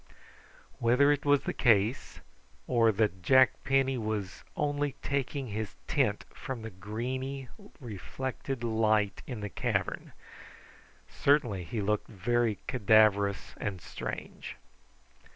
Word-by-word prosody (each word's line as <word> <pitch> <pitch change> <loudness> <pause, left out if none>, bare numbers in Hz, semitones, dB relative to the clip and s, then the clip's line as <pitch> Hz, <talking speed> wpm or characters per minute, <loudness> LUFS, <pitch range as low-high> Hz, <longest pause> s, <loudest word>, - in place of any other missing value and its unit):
Whether 125 +5 +4
it 145 0 0
was 145 -1 +4
the - - -3
case, 110 +1 +2 0.4
or 115 -3 +4
that 100 -3 0
Jack 130 +7 +6
Penny 135 -1 +2
was 105 -3 -3
only 145 -1 0
taking 140 -1 -2
his 105 0 -4
tint - - +1
from 125 -4 -6
the 110 - -6
greeny 125 +7 -4 0.3
reflected 130 - -5
light 110 -3 +1
in 120 -5 -5
the 105 - -4
cavern, - - -2 0.9
certainly 130 -10 +2
he 110 +4 -3
looked 105 +1 0
very 115 +1 0
cadaverous 105 -4 +3
and 100 -4 -3
strange. - - -7
115 Hz, 115 wpm, -30 LUFS, 105-130 Hz, 0.9 s, Jack